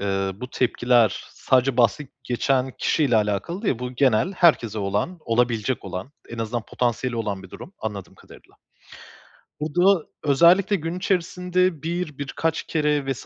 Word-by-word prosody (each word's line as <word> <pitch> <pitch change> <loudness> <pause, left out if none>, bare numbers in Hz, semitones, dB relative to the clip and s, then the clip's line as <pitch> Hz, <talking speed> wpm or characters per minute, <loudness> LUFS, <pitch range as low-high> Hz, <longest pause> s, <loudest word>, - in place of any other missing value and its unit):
ııı, 95 -1 -2
bu 125 0 -6
tepkiler 120 -3 +2
sadece 130 -1 +1
bahsi 125 +4 +2
geçen 130 +1 0
kişiyle 140 -7 +2
alakalı 105 - -1
değil, 130 - 0
bu 125 0 -5
genel 130 - +2
herkese 135 - +3
olan, 100 - -2
olabilecek 115 -1 0
olan, 95 +9 -6 0.2
en 115 - -8
azından 115 +1 -2
potansiyeli 120 +2 -2
olan 105 -4 -3
bir 95 - -13
durum, 185 - -10
anladığım 100 -4 -6
kadarıyla. - - -18 1.1
Bu 155 +1 -4
da 180 -2 +4 0.2
özellikle 170 +8 +4
gün 165 0 -4
içerisinde 180 -2 0
1, 165 -3 -3
birkaç 155 +3 -2
kere 150 -3 0
vs. 135 - -6
130 Hz, 145 wpm, -23 LUFS, 115-165 Hz, 1.1 s, da